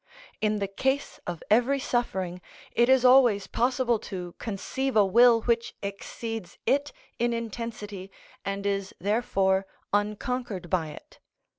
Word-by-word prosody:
In 215 0 +2
the 200 -1 -1
case 265 +8 -1
of 175 -2 -4
every 245 +5 +4
suffering, 190 -9 -2 0.3
it 240 +1 +3
is 260 -1 +5
always 245 -6 +6
possible 245 +1 +1
to 180 -5 -6
conceive 250 +5 -3
a 210 -2 +6
will 235 +3 +6
which 235 -1 0
exceeds 200 0 -6
it 285 +1 +2 0.3
in 240 0 +1
intensity 220 -4 -5 0.3
and 200 0 -3
is 200 -1 -1
therefore 195 -2 +1 0.3
unconquered 210 -2 -2
by 175 -4 +1
it. 150 - -12
220 Hz, 130 wpm, -27 LUFS, 195-245 Hz, 0.3 s, always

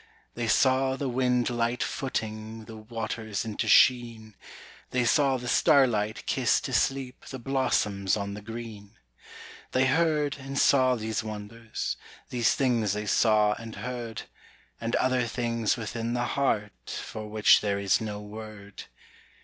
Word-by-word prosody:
They 120 -1 -3
saw 130 +3 +3
the 135 +1 -3
wind 125 -1 +1
light 120 0 0
footing 110 -3 -4
The 110 - -10
waters 110 -1 -4
into 110 -2 -3
sheen; 115 -3 +4 0.6
They 125 -1 0
saw 135 +1 +3
the 125 0 -7
starlight 115 -6 +3
kiss - - +2
to - - -5
sleep 135 -1 -1
The 130 - -7
blossoms 110 -7 0
on 100 -1 -4
the 105 - -7
green. 110 -1 -9 0.8
They 130 +1 +3
heard 150 0 +1
and 135 +1 -6
saw 130 -2 +4
these 110 0 -3
wonders; 110 +1 -5 0.3
These 120 -2 +2
things 120 -7 +1
they 105 +1 -3
saw 105 0 +3
and 115 -1 -8
heard; 115 0 -5 0.6
And 115 +1 -1
other 130 -2 +1
things 115 -1 -1
within 115 +1 -3
the 120 0 0
heart 105 - -1
For 110 -1 -7
which 105 0 +5
there 100 -1 0
is 100 0 +2
no 105 -2 -4
word. 105 -1 -10
115 Hz, 140 wpm, -27 LUFS, 110-125 Hz, 0.8 s, which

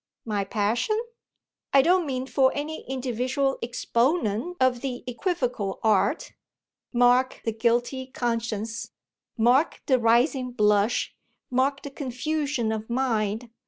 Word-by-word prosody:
"My 210 -3 -1
passion 220 - 0 0.4
?" - - -62
"I 270 - +7
don't 355 0 +3
mean 260 -1 -2
for 265 -1 +3
any 300 +2 -4
individual 265 +1 -1
exponent 240 - 0
of 255 -2 +2
the 255 -2 -4
equivocal 250 - -2
art: 215 -3 +1 0.6
mark 245 +1 +3
the 225 - +1
guilty 240 +3 0
conscience, 230 -2 -3 0.5
mark 245 +7 +3
the 260 -2 +3
rising 245 +2 +2
blush, 210 0 +2 0.4
mark 270 +2 +1
the 285 - -7
confusion 275 -2 -2
of 220 0 -4
mind! 230 -2 -1
245 Hz, 120 wpm, -26 LUFS, 225-270 Hz, 0.6 s, I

